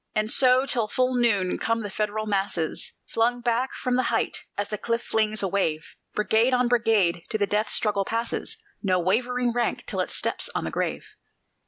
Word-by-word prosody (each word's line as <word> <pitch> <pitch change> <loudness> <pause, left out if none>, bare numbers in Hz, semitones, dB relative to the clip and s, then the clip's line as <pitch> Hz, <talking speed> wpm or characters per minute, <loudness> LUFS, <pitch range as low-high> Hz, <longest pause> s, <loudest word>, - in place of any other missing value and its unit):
And 215 +1 +1
so 255 0 +4
till 235 -5 +1
full 255 +4 0
noon 215 -7 +2
come 230 0 0
the 205 - -5
Federal 215 +1 -2
masses 195 -6 -1
Flung 240 +2 +1
back 240 +2 0
from 250 -1 -1
the - - +3
height, - - -1
as 205 0 -2
the 210 - -3
cliff 230 +2 -1
flings 215 -1 0
a - - +2
wave; 165 -5 -1 0.2
Brigade 225 +4 +3
on 250 0 +2
brigade 220 -8 +2
to 220 - 0
the 205 - +2
death 210 +2 0
struggle 205 -2 +1
passes, 230 +3 -3 0.2
No 185 -3 +2
wavering 240 +7 +1
rank 240 0 -1
till - - -2
it - - 0
steps - - 0
on - - -1
the - - -3
grave. - - -3
220 Hz, 190 wpm, -25 LUFS, 200-245 Hz, 0.2 s, so